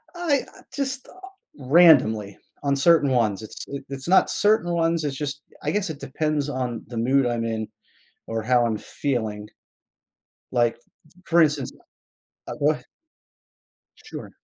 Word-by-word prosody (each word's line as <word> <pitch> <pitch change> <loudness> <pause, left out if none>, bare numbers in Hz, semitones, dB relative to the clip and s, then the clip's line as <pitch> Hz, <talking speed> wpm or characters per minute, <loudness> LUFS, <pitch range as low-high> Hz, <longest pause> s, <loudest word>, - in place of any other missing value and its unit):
I, 335 -5 +1 0.2
uh, - - -16
just, 270 -1 -3
uh, - - -15 0.4
randomly, 130 - +4 0.3
on 140 -1 +2
certain 145 0 +4
ones, 110 -6 +1
it's 110 - -8
i 140 - -3
it's 135 +1 -7
not 190 +2 +5
certain 205 -5 +2
ones, 165 -1 +1
it's 145 -2 -2
just 145 0 -4 0.2
I - - 0
guess 200 -3 -1
it 145 -2 -6
depends 150 0 -2
on 125 -4 -3
the 120 0 -7
mood 130 +4 +2
I'm 120 -1 -1
in 110 -1 -3 0.6
or 115 -1 -3
how 120 +1 +3
I'm 110 -2 -1
feeling. 110 -7 -3 1.0
Like 120 -2 +2 0.5
for 170 0 +4
instance, 150 -4 +2 0.8
I - - -4
go 150 +2 +4
ah - - -10 1.1
Sure. - - -9
140 Hz, 150 wpm, -24 LUFS, 120-165 Hz, 1.1 s, not